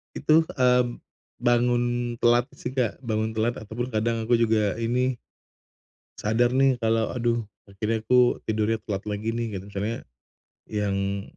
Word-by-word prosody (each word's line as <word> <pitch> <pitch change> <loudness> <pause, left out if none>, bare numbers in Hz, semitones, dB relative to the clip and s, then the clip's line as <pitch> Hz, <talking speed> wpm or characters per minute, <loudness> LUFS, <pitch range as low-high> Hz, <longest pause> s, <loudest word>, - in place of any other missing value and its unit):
Itu, 160 +1 +4
mmm, 125 -2 +2 0.4
bangun 120 0 +3 0.4
telat 120 0 +4
sih, - - -4
Kak, 125 -1 -1
bangun 110 -2 -1
telat 115 +2 0
ataupun 110 +3 -5
kadang 115 +1 0
aku 120 +1 +3
juga 110 -3 +2
ini 125 +2 0 1.0
sadar 115 +3 +2
nih 130 -1 +2
kalo 115 0 +1
aduh 120 -2 0 0.2
akhirnya 110 +3 -2
aku 125 +2 +3
tidurnya 110 0 0
kuat 95 -1 -3
lagi 105 +1 -3
nih, 115 -1 -2
gitu. 95 +1 -6
Misalnya 105 +3 -3 0.7
yang 100 -1 -1
115 Hz, 135 wpm, -25 LUFS, 110-120 Hz, 1.0 s, Itu